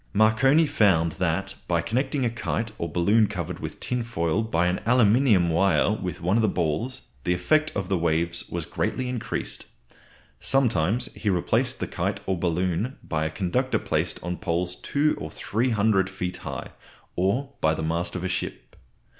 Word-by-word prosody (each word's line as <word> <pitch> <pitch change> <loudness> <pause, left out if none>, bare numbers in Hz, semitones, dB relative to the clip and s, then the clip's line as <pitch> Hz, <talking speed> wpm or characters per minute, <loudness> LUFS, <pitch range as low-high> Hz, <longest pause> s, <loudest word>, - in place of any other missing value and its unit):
Marconi 110 +9 +4
found 90 - +3
that - - 0
by - - +2
connecting 130 +3 0
a - - +2
kite 115 -1 -2
or 85 - -2
balloon 105 +6 +3
covered 90 -6 -4
with - - -6
tinfoil 115 -7 -1
by 90 -6 +1
an 90 +1 +1
aluminium 115 -6 +4
wire 95 +4 +3
with 95 -6 -4
one 90 +5 +2
of - - +3
the 110 - +3
balls, 105 - -1 0.2
the 90 - +1
effect 155 +12 +2
of 95 -3 -2
the 95 -2 0
waves 85 +1 0
was - - -3
greatly 130 - -2
increased. 125 -2 -4 0.7
Sometimes 120 -5 +1
he 105 - -2
replaced 90 -3 +1
the - - -1
kite 95 +4 -2
or 95 - 0
balloon 90 +7 -1
by 80 -1 -1
a - - 0
conductor 90 +1 0
placed - - -1
on 90 0 -3
poles 90 -2 -1
two 150 +2 +1
or 80 - -4
three 115 +10 -1
hundred 105 -4 +2
feet 90 -1 -4
high, - - -6 0.4
or 120 +10 0
by 80 0 +3
the 80 - -4
mast 85 +3 -1
of 90 - -3
a - - 0
ship. 90 - -4
95 Hz, 170 wpm, -25 LUFS, 85-115 Hz, 0.7 s, Marconi